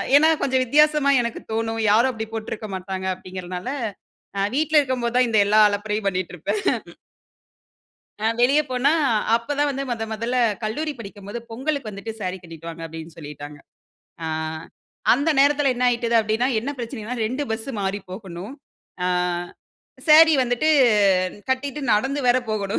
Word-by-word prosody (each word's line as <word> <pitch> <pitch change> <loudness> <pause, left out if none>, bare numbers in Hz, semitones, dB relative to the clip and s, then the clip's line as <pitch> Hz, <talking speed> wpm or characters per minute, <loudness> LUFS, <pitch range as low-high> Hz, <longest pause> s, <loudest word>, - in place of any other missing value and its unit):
ஏன்னா, 315 +2 +6
கொஞ்சம் 260 -1 +2
வித்தியாசமா 300 +1 +4
எனக்கு 235 - -4
தோணும். 225 0 -1
யாரும் 235 +5 +4
அப்படி 220 -1 -4
போட்டுருக்க 215 -1 -5
மாட்டாங்க 190 0 -5
அப்பிடீங்கிறதனால, 185 +2 -7 0.7
அ - - +1
வீட்ல 310 +1 +4
இருக்கும் 260 -3 -2
போது 235 +1 -2
தான், 250 - +4
இந்த 220 -2 +3
எல்லா 215 +1 +4
அலப்பரையும் 205 0 -2
பண்ணிட்டு 185 -1 -4
இருப்பேன். 180 - -2 1.6
அ 215 - -1
வெளிய 275 +5 +5
போனா, 260 +4 +2 0.4
அப்போ 235 +5 -4
தான் 290 0 +3
வந்து, 275 0 -3
முதன் 225 -2 -3
முதல்ல 235 +3 -1 0.3
கல்லூரி 300 +8 -2
படிக்கும்போது 205 +1 -8
பொங்கலுக்கு 265 0 -3
வந்துட்டு, 205 +2 -7
"சாரி 185 -1 -3
கட்டிட்டுவாங்க." 165 0 -9
அப்பிடீன்னு 160 0 -10
சொல்லிட்டாங்க. 145 -1 -9 0.7
ஆ - - -2 0.9
அந்த 285 +6 +2
நேரத்தில 285 0 +4
என்ன 250 +1 -1
ஆகிட்டது? 235 -1 0
அப்டின்னா, 220 +4 0
என்ன 275 +5 -4
பிரச்சனன்னா, 235 -1 -5
2 255 +6 -3
பஸ்ஸு 225 +4 -3
மாறி 195 +1 -1
போகணும். 190 +2 -8 0.5
ஆ - - +1 1.0
சாரி 320 +1 +8
வந்துட்டு 245 +5 0 0.8
கட்டிட்டு 275 +2 -1
நடந்து 270 +7 +1
வேற 245 - +5
போகணும். 200 -1 -1
230 Hz, 145 wpm, -23 LUFS, 200-270 Hz, 1.6 s, சாரி